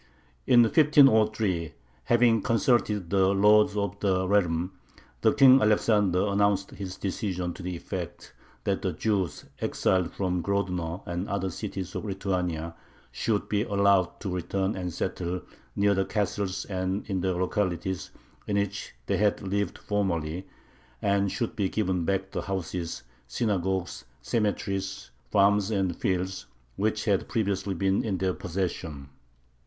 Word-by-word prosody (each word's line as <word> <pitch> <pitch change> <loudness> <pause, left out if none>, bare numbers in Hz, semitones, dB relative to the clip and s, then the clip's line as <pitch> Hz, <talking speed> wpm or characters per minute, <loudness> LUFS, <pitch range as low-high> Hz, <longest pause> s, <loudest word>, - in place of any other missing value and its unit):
In 120 -1 +7
1503, 110 - +4 0.3
"having 120 -2 +4
consulted 110 -5 +1
the 95 -1 +4
lords 105 +2 +4
of 100 -1 -2
the 95 -2 +1
realm," 90 -3 +1 0.7
King 135 -1 +8
Alexander 105 -3 +3
announced 100 -1 +1
his 95 -2 -7
decision 90 -3 -3
to - - -10
the 90 0 -4
effect 85 0 -6 0.3
that - - 0
the - - -1
Jews 100 -7 -1
exiled 95 -2 +1
from 90 -2 -1
Grodno 90 -3 -2
and 85 +3 -4
other 95 -1 -1
cities 95 +2 -5
of - - -4
Lithuania 90 -5 -2 0.4
should 105 -3 -1
be 105 -1 +1
allowed 100 -4 +2
to 95 -3 -3
return 95 +3 -1
and 90 -1 -3
settle 90 +2 -3 0.3
"near 100 0 +3
the 95 0 +1
castles 100 -2 -2
and 95 0 -2
in 95 -3 -1
the 95 0 0
localities 90 0 -1 0.4
in 100 - 0
which 100 -5 -3
they - - 0
had 105 0 +2
lived 100 +1 -1
formerly," 90 -4 -2 0.5
and 100 +1 +1
should 115 -1 -3
be 100 -4 0
given 95 -5 0
back 95 +1 -1
the - - -2
houses, 90 -3 -4 0.2
synagogues, 95 - -1 0.2
cemeteries, 95 - -2 0.2
farms, 100 0 +3
and 95 -5 0
fields, 95 -7 -2 0.3
which 110 +1 -1
had 100 -4 +1
previously 100 -3 -1
been 95 +2 +1
in 100 -4 -1
their 95 0 0
possession. 85 -7 -4
95 Hz, 135 wpm, -27 LUFS, 90-105 Hz, 0.7 s, King